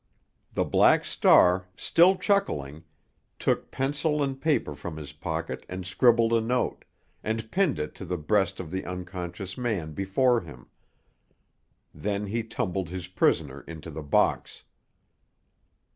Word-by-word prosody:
The - - +1
Black - - +4
Star, 90 +1 +4
still 185 +3 +4
chuckling, 80 - -1 0.5
took - - 0
pencil 145 +2 0
and 135 -1 -3
paper 150 - +1
from 80 +2 -7
his 75 -2 -8
pocket 80 +1 -4
and 90 0 -5
scribbled 115 +4 +3
a 115 - +4
note, 125 +3 -1 0.4
and 110 0 -3
pinned 190 -6 +2
it 75 0 -4
to - - -5
the 90 +1 -2
breast 95 +3 +1
of 80 -4 -6
the 95 - -3
unconscious 90 +2 -6
man 100 -11 -2
before 115 - +2
him. 70 -9 -12 1.3
Then 100 +6 -2
he 115 +4 -2
tumbled 95 -5 -3
his 90 -1 -6
prisoner 75 -6 +1
into 80 0 -8
the 80 +1 -6
box. 70 -1 0
95 Hz, 135 wpm, -27 LUFS, 80-120 Hz, 1.3 s, Black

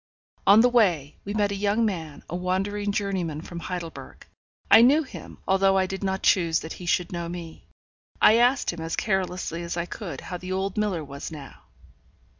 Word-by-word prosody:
On 205 +3 +8
the 245 - +5
way, 175 - +2
we 205 +1 -4
met 205 -1 +1
a - - -2
young 205 +3 +1
man, 165 -8 -4
a 175 - -5
wandering 195 +3 -1
journeyman 190 -7 -2
from 170 +1 -8
Heidelberg. 170 -1 -7 0.5
I - - +9
knew 285 +6 +5
him, 265 - -10
although 195 0 +3
I 190 - +3
did 195 +1 -5
not 190 0 -1
choose 170 -4 +3
that 160 - -6
he 180 - -9
should 175 0 +1
know 170 -1 -4
me. 170 -2 -8 0.5
I 220 - +6
asked 245 -3 +3
him, 170 - -7
as 165 0 -3
carelessly 185 -4 -2
as 170 0 -4
I 170 - -1
could, 175 - -7
how 180 - -6
the 185 +1 -5
old 190 0 -2
miller 205 -6 -1
was 140 -1 -7
now? 150 -4 -11
185 Hz, 195 wpm, -25 LUFS, 170-205 Hz, 0.5 s, I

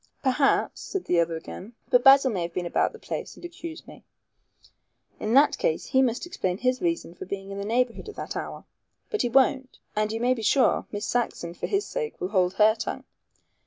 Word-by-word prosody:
"Perhaps," 275 +1 +2
said 390 - -4
the 175 - +2
other 165 0 +1
again; 185 +6 -9 0.2
"but 245 0 +5
Basil 270 -1 +7
may 190 -5 -2
have 170 0 -4
been 180 - -2
about 175 - +1
the - - -12
place - - -6
and - - -16
have 345 - -7
accused 335 -1 -9
me." - - -13 1.2
"In 220 +3 0
that 285 +2 +5
case - - 0
he 265 - +3
must 245 +1 0
explain 185 - -2
his 255 +3 0
reason 335 - -1
for - - -9
being 195 0 -5
in 195 - -5
the 200 - -4
neighborhood 245 - 0
at 425 - -10
that - - -6
hour. - - -6 0.5
But 430 - 0
he 245 - 0
won't, 265 +1 +2 0.2
and 215 0 0
you 225 - -3
may 245 +2 +3
be 240 - -5
sure 255 +5 +3
Miss 205 +1 -4
Saxon, 220 -8 -2
for - - -4
his 400 0 0
sake, 470 -3 -4
will 180 - -2
hold 185 -2 +1
her 215 0 +5
tongue. 220 - -5
245 Hz, 220 wpm, -26 LUFS, 200-275 Hz, 1.2 s, Basil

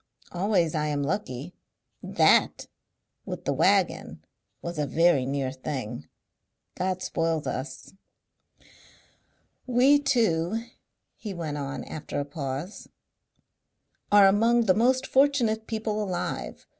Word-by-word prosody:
Always 180 -3 +1
I 150 -2 -1
am 145 -1 -1
lucky. 150 -1 -4 0.5
THAT - - +3 0.6
with - - -7
the - - +1
waggon - - +1 0.4
was 170 -2 -5
a 150 - 0
very 165 -6 +3
near 135 -1 -2
thing. 130 -3 -6 0.7
God 185 0 -2
spoils 165 -2 -1
us. 130 +7 -6 1.7
"We 255 +4 +5
two," 225 - +1 0.5
he 205 -4 -7
went 155 -4 -4
on, 140 0 -5
after 155 - -6
a 145 - -2
pause, 145 +5 -6 1.2
"are 205 -1 +7
among 225 +5 +4
the 190 - +5
most 255 +5 +2
fortunate 255 -6 +2
people 215 -1 -2
alive. 185 -3 -4
175 Hz, 110 wpm, -26 LUFS, 145-220 Hz, 1.7 s, are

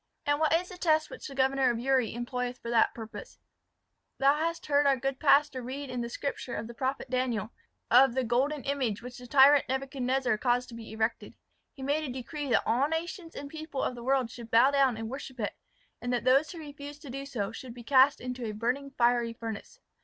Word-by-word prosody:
"And 290 0 +2
what 315 -1 +2
is 345 +2 +2
the 360 - -10
test 315 -3 +2
which - - -8
the 275 - -9
governor 265 0 +3
of 240 - 0
Uri 255 -1 +1
employeth 250 +1 -3
for 235 - -6
that 230 -1 +3
purpose?" 225 - -9 0.8
"Thou 275 +1 +5
hast 330 +2 -2
heard 285 -1 +3
our 275 -1 +4
good 270 +2 -2
pastor 280 -3 +4
read 265 +2 -6
in 250 -1 -3
the 235 - -4
Scripture 265 -1 -4
of - - -4
the 235 - -9
prophet 265 +3 -2
Daniel, 245 -4 -1 0.4
of 255 +1 +6
the 260 - +1
golden 265 +5 0
image, 255 -6 -1
which 250 0 -8
the 245 - -11
tyrant 280 +1 +6
Nebuchadnezzar 265 -3 0
caused 245 0 +1
to 235 - -9
be 230 -2 -9
erected. 220 +1 -2 0.4
He 270 - -8
made 290 +3 0
a 275 - -4
decree 275 +3 -5
that 240 - +3
all 255 +5 +2
nations 330 +2 -4
and 285 - -6
people 310 -2 -5
of - - -1
the 240 -1 -9
world 260 -2 +1
should 235 -1 -10
bow 235 +5 +5
down 270 -4 +3
and 225 0 -4
worship 260 0 -7
it, 210 - -2 0.5
and 245 - -2
that 245 - 0
those 270 +4 +4
who 350 - -9
refused 290 -1 -9
to 275 - -8
do 275 +2 -5
so 215 -7 -3
should 240 +1 -9
be 240 - -10
cast 270 +3 +5
into 250 0 -5
a 215 - -3
burning 250 +6 -2
fiery 235 -1 +2
furnace. 225 - -7
260 Hz, 220 wpm, -29 LUFS, 240-285 Hz, 0.8 s, of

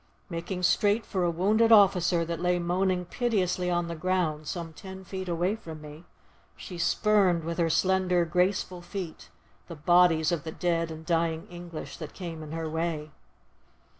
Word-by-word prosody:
Making 175 +2 -4
straight 205 +4 +3
for 185 -3 -1
a 175 - +2
wounded 210 +7 +2
officer 185 -5 +5
that 165 -1 -4
lay 180 0 +2
moaning 180 +1 0
piteously 180 -4 0
on 175 -1 0
the 170 - -4
ground, 160 -3 -1
some 165 +1 -5
ten 190 +3 -10
feet 190 0 -6
away 175 +4 0
from 160 -8 -9
me, 150 +2 -11 0.5
she 180 -2 -9
spurned 190 -3 +3
with 170 +2 -4
her 165 -1 +2
slender, 185 0 +2
graceful 180 +1 0
feet, 175 -2 -7 0.4
the 170 - -7
bodies 165 +1 +4
of 165 -5 -1
the 160 - -5
dead 170 -1 0
and 160 0 -8
dying 165 -1 0
English 175 -2 -8
that 155 -3 -8
came 170 -4 -6
in 155 -1 -8
her 165 0 -3
way. 160 -1 -3
175 Hz, 165 wpm, -28 LUFS, 165-185 Hz, 0.5 s, officer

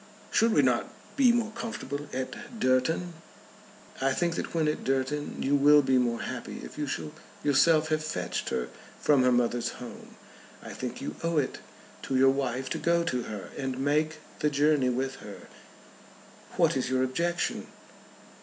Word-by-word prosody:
"Should 230 +1 +4
we 145 - +4
not 125 -2 +1 0.2
be 265 -4 +6
more 235 -2 0
comfortable 220 - -5
at 235 - -6
Durton?" 145 +7 +1 0.9
"I 135 0 +2
think 170 +4 0
that - - -4
when 160 -2 +2
at 150 - -1
Durton 135 +2 -1
you 140 - +1
will 145 +1 +6
be 130 -1 +3
more 120 -2 0
happy - - -6
if - - -9
you 150 -1 -3
shall 150 +2 -4 0.3
yourself 155 +2 +4
have 155 0 0
fetched 90 -12 -3
her 60 -1 -2 0.3
from 145 -3 +4
her 125 0 +4
mother's 120 -1 +1
home. 125 - -10 0.5
I - - -8
think - - -5
you - - -5
owe 165 -1 0
it 140 -3 0 0.4
to 135 - -3
your 135 +1 +6
wife 130 -1 -2
to - - -1
go 170 0 +2
to 125 -6 -1
her, 105 -3 -7
and 130 -2 -3
make 150 +3 +1 0.2
the 150 - +2
journey 145 -2 +3
with 130 +2 -2
her. - - -11 1.1
What - - +4
is 130 -2 -1
your 130 0 +2
objection?" 170 +7 -1
140 Hz, 170 wpm, -28 LUFS, 130-160 Hz, 1.1 s, be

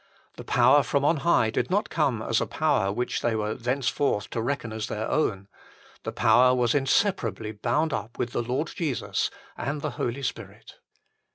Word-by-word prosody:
The - - -7
power 125 +4 +5
from 140 0 0
on 160 +2 +3
high 135 -7 +2
did - - -1
not 205 +3 0
coine 135 -9 0
as - - +2
a - - -1
power 95 0 +1
which 120 +4 -2
they 115 -2 0
were 105 0 -1
thenceforth 125 -2 -1
to 115 - -2
reckon 115 -2 -3
as 110 -1 -3
their 110 +1 -3
own: 100 -10 0 0.5
the - - -4
power 125 0 +4
was 120 -2 +2
inseparably 135 - +1
bound 125 +9 0
up 115 - -5
with 120 - -2
the - - -1
Lord 130 +7 -2
Jesus 155 -9 -1 0.3
and 145 +3 -3
the 150 - -1
Holy 125 +4 -2
Spirit. - - -7
125 Hz, 180 wpm, -26 LUFS, 115-145 Hz, 0.5 s, power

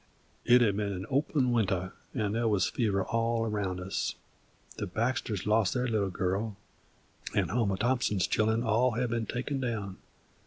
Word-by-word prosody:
It 125 +1 +6
had 105 -4 +3
been 105 -1 -1
an 95 0 -5
open 135 -2 +2
winter, 95 -5 0 0.2
'nd 105 -3 0
there 115 +1 +1
wuz 105 -3 +2
fever 100 -5 0
all 115 0 0
around 100 -4 -2
us. 90 +2 -2 0.6
The - - -3
Baxters 110 0 -1
lost 105 -1 +2
their 125 0 +1
little 105 -4 +1
girl, 95 +4 -2 0.8
and - - +1
Homer 105 -4 +1
Thompson's 110 -5 +1
children 110 +3 +1
had - - -3
all 120 +2 +2
been 115 -2 -1
taken 130 +4 -2
down. 110 -7 -3
110 Hz, 160 wpm, -30 LUFS, 100-120 Hz, 0.8 s, It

